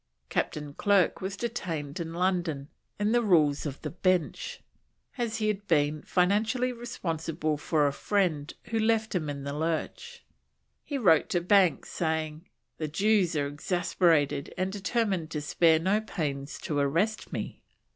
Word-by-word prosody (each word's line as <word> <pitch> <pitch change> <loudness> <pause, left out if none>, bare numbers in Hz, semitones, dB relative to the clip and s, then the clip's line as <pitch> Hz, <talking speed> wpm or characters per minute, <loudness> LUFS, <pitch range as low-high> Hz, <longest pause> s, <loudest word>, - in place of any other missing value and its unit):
Captain 150 -2 -2
Clerke 200 +2 +2
was 195 +1 -4
detained 170 -11 -4
in 165 -1 -4
London, 170 -5 -1 0.3
"in 210 +1 +1
the 240 +1 +4
Rules 155 -9 +3
of 140 -1 -6
the - - -3
Bench," 185 - 0 0.6
as 235 -4 -2
he 215 -1 0
had 205 -1 -2
become 150 -2 +2
financially 220 +7 +1
responsible 165 -9 -3
for 150 0 +1
a 140 - +1
friend 170 -8 0 0.2
who 225 - +1
left 220 0 +1
him 160 -5 -1
in 140 -1 -5
the 140 0 -4
lurch. 165 - -3 0.6
He 285 - -3
wrote 175 - +4
to 175 - +2
Banks, 185 -1 +3
saying, 160 0 -2 0.3
"the 155 - -1
Jews 190 +2 +2
are 145 -1 +1
exasperated 155 -1 +1
and 185 +1 -1
determined 195 -4 -1
to 155 - -3
spare 160 +2 +4
no 190 +6 +1
pains 145 -9 -4
to 145 -2 -1
arrest 170 +11 0
me." - - -5
175 Hz, 150 wpm, -28 LUFS, 150-205 Hz, 0.6 s, the